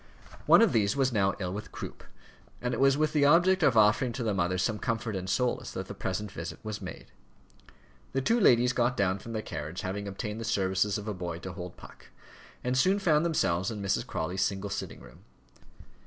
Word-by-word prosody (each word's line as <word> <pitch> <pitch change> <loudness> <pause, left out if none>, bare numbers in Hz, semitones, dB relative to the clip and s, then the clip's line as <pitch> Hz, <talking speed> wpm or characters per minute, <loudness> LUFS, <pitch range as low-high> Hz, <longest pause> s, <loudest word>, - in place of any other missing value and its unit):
One - - +8
of 215 - +3
these 100 -3 +2
was 135 -2 +2
now 100 -2 +2
ill 90 -2 -3
with 105 +2 -7
croup, - - -8 0.6
and 125 0 -2
it - - -2
was 135 0 +4
with 155 0 +1
the 145 -2 +3
object 180 +5 +5
of 135 -7 +4
offering 110 +4 +4
to 125 - -4
the 110 -2 0
mother 90 -1 0
some 105 +3 0
comfort 115 -2 -2
and 95 0 -4
solace, 125 +3 0
that - - -5
the - - -6
present 100 +2 -4
visit - - -6
was 110 -1 -5
made. - - -9 1.0
The 135 - +1
two 230 - +3
ladies 125 - +5
got 125 +1 +1
down 95 -2 +1
from 115 +4 -8
their 110 -1 -3
carriage, 80 +5 -5
having 100 +1 -4
obtained 105 +3 -5
the - - -3
services 100 -1 +1
of 105 +1 -7
a 105 - -2
boy 90 -3 -5
to 95 - -6
hold 90 -1 -8
Puck, - - -14 0.6
and 125 +1 0
soon 185 +10 +3
found 160 -6 +3
themselves 95 - +1
in 110 -3 -5
Mrs. 100 -1 -1
Crawley's 90 +4 -3
single 100 0 -1
sitting - - -5
room. - - -15
105 Hz, 215 wpm, -29 LUFS, 95-130 Hz, 1.0 s, One